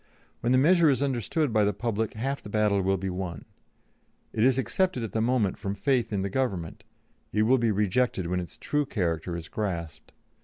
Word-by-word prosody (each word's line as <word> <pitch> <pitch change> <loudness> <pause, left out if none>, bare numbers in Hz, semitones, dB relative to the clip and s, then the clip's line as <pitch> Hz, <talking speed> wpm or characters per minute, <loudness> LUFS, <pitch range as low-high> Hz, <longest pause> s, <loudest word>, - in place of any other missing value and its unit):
When 120 - 0
the 130 - +5
measure 165 +4 +5
is 140 0 +2
understood 135 - 0
by 110 -1 +4
the 105 0 +2
public 110 0 -2
half 135 +5 -2
the - - -10
battle 105 -1 +2
will 95 +1 +1
be 95 +1 -3
won; 90 -4 -5 0.9
it 110 - +1
is 130 0 +4
accepted 180 +1 0
at 110 - -4
the 110 - 0
moment 115 -4 +1
from 100 -2 -3
faith 125 +2 +1
in 100 -2 -1
the 100 - -2
Government; 95 -10 -2 0.5
it 105 - +2
will 125 +4 +4
be 115 -1 +2
rejected 105 0 +1
when 90 +1 -1
its 85 - -7
true 150 -1 -1
character 85 - -2
is 85 -1 -7
grasped. 85 -6 -4
110 Hz, 200 wpm, -27 LUFS, 95-130 Hz, 0.9 s, the